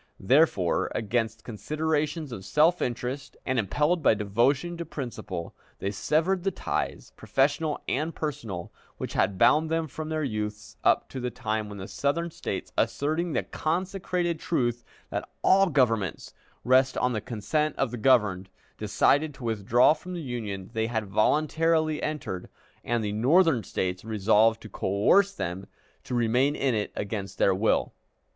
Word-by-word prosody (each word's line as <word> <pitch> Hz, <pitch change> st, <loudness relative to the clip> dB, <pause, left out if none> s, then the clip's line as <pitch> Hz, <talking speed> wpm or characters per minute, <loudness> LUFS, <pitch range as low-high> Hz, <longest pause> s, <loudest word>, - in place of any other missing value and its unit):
Therefore, 120 Hz, -, +2 dB
against 110 Hz, 0 st, -1 dB
considerations 155 Hz, -, -2 dB
of 105 Hz, -5 st, -7 dB
self 155 Hz, -, +3 dB
interest, 125 Hz, +3 st, -3 dB
and 130 Hz, -1 st, +1 dB
impelled 150 Hz, -, +1 dB
by 115 Hz, -, +4 dB
devotion 120 Hz, -, +1 dB
to 170 Hz, -, -3 dB
principle, 125 Hz, -, -6 dB, 0.2 s
they 100 Hz, -, -2 dB
severed 160 Hz, -, +1 dB
the 195 Hz, -, +2 dB
ties, -, -, -3 dB
professional 145 Hz, +3 st, 0 dB
and 155 Hz, +5 st, -1 dB
personal, 115 Hz, -, -5 dB, 0.2 s
which -, -, -5 dB
had 100 Hz, -, +1 dB
bound 155 Hz, +10 st, +4 dB
them 165 Hz, 0 st, 0 dB
from 155 Hz, +2 st, -6 dB
their 155 Hz, -1 st, -1 dB
youth 105 Hz, -4 st, -4 dB
up -, -, +3 dB
to 130 Hz, -, -6 dB
the 125 Hz, 0 st, -2 dB
time 110 Hz, -3 st, -3 dB
when 105 Hz, -, -8 dB
the 95 Hz, 0 st, -7 dB
Southern 165 Hz, +4 st, -1 dB
States, -, -, -5 dB
asserting 155 Hz, +3 st, 0 dB
the -, -, 0 dB
consecrated 175 Hz, 0 st, -2 dB
truth 120 Hz, -8 st, -1 dB, 0.3 s
that -, -, -3 dB
all 195 Hz, +1 st, +5 dB
governments 115 Hz, -, 0 dB, 0.3 s
rest 130 Hz, +1 st, +3 dB
on 125 Hz, 0 st, +1 dB
the 110 Hz, -, -2 dB
consent 130 Hz, +6 st, -1 dB
of 135 Hz, -4 st, -1 dB
the 125 Hz, -, -4 dB
governed, 105 Hz, -7 st, +3 dB, 0.3 s
decided 150 Hz, 0 st, +2 dB
to 135 Hz, -, -12 dB
withdraw 115 Hz, +4 st, +4 dB
from 180 Hz, +4 st, -8 dB
the 170 Hz, -, -4 dB
Union 105 Hz, -6 st, -5 dB
they 110 Hz, 0 st, 0 dB
had 110 Hz, -2 st, -2 dB
voluntarily 155 Hz, +9 st, +2 dB
entered, 140 Hz, -12 st, -4 dB, 0.3 s
and 120 Hz, -1 st, 0 dB
the 105 Hz, -, -2 dB
Northern 135 Hz, -, +4 dB
States 90 Hz, 0 st, -3 dB
resolved 110 Hz, +1 st, +3 dB
to -, -, -8 dB
coerce 105 Hz, -, +3 dB
them 95 Hz, -, -5 dB, 0.4 s
to 125 Hz, -, -3 dB
remain 120 Hz, +5 st, +2 dB
in 135 Hz, -3 st, +1 dB
it 105 Hz, -2 st, -1 dB
against 100 Hz, -1 st, -4 dB
their 95 Hz, -, +4 dB
will. 100 Hz, +4 st, +1 dB
125 Hz, 155 wpm, -27 LUFS, 105-155 Hz, 0.4 s, all